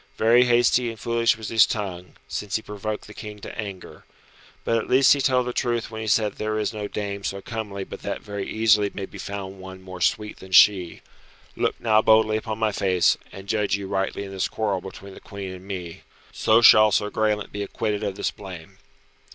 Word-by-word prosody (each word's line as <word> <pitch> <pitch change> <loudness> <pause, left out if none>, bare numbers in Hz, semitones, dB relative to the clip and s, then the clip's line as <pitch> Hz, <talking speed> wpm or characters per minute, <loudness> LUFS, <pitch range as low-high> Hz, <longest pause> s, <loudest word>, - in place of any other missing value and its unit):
Very 120 +3 +5
hasty 120 0 +3
and 115 -1 -8
foolish 115 0 +1
was 110 -2 -6
his 115 -2 +5
tongue, 90 -4 -5
since 105 -1 -4
he 110 - -1
provoked 105 +1 -5
the 105 - -12
King 105 0 -8
to - - -8
anger. 100 -4 -8 0.6
But 115 0 +1
at - - -5
least 130 +1 +6
he 140 - -1
told 130 -2 +2
the 125 - -3
truth 120 -2 -1
when 110 0 -6
he 110 - -5
said 105 0 +2
that - - -23
there 110 0 -1
is 105 0 -1
no 105 -1 -4
dame 100 -1 -5
so 100 0 -3
comely 105 -2 -5
but - - -9
that - - -5
very 100 -1 -5
easily 105 -2 +3
may 100 - -4
be - - -12
found 95 -1 -6
one 95 0 -10
more 95 -1 -9
sweet 105 +3 0
than 95 0 -11
she. 90 -3 +5 0.5
Look - - -1
now 110 -2 +3
boldly 110 0 +4
upon 110 0 -4
my 110 -1 +1
face, 95 -3 +2 0.2
and 95 0 -11
judge 105 -2 +1
you 100 -1 -5
rightly 95 +1 -2
in 100 - -8
this 95 0 -1
quarrel 100 -4 -1
between 95 +1 -10
the - - -12
Queen 100 -3 -8
and 95 +1 -12
me. 90 -4 -6 0.3
So 115 +2 +3
shall 110 -1 +8
Sir 105 +1 +1
Graelent 105 -1 0
be 105 - -5
acquitted 105 +1 -2
of 100 -2 -2
this - - -2
blame." 90 -5 -11
105 Hz, 215 wpm, -24 LUFS, 95-110 Hz, 0.6 s, shall